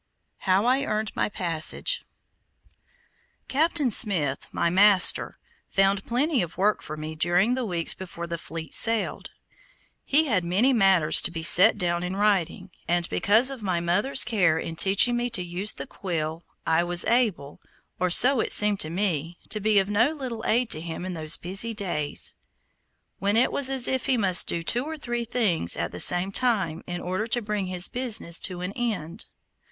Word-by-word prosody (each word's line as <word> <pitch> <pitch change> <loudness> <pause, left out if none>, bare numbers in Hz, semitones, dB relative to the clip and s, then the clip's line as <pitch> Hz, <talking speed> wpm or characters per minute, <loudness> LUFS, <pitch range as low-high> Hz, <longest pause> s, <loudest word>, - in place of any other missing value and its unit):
HOW 190 +4 +2
I 260 +2 +1
EARNED 215 -4 -3
MY - - -1
PASSAGE 180 - -2 1.5
Captain 295 -2 0
Smith, 170 - +1
my - - -1
master, 195 0 +3 0.3
found 195 0 0
plenty 270 +3 0
of 170 -2 -7
work 205 +3 0
for 155 - -9
me 155 +1 -7
during 175 +8 0
the 255 -2 -3
weeks 170 -3 +1
before 170 -2 -9
the 170 -1 -6
fleet 160 -2 -9
sailed. 225 -1 +1 0.7
He 305 +3 +2
had 205 - -1
many 200 +10 +1
matters 190 -8 +4
to - - -2
be 165 -1 -7
set 185 +7 +6
down 175 -1 -2
in 180 +1 -5
writing, 195 -2 -1 0.2
and 175 0 0
because 225 +6 +2
of 265 -4 -8
my 185 -4 -2
mother's 205 +11 +2
care 180 -9 0
in 165 0 -6
teaching 200 +7 +3
me 240 0 -2
to 205 -6 -3
use 180 +4 -2
the - - -8
quill, 165 -3 -6 0.2
I 165 +1 +1
was 175 0 +1
able, 215 - -1 0.4
or 180 0 0
so 255 +8 +6
it - - -1
seemed 210 -1 +5
to 155 - +2
me, 170 -2 -3
to 215 - -2
be 210 0 +1
of 195 -1 +2
no 230 +9 +1
little 250 -7 -7
aid 235 +1 0
to 155 - +1
him 170 +1 -7
in 185 - -6
those 155 -2 0
busy 195 +6 -2
days, 170 -8 -2 0.9
when 200 +2 0
it 250 - +2
was 275 -2 +1
as 265 -2 +2
if 260 -2 -2
he 260 - +1
must 190 -5 +6
do 170 - -2
two 240 +8 0
or 315 +2 -7
three 240 -4 -5
things 195 - 0
at - - -4
the - - -9
same 180 +2 +4
time 195 -9 -1
in 175 0 -6
order 185 +5 -4
to 240 +1 0
bring 210 -2 -4
his 180 0 +2
business 225 -9 -1
to 180 -2 -6
an 180 +2 -5
end. 210 -7 -4
195 Hz, 185 wpm, -24 LUFS, 175-235 Hz, 1.5 s, set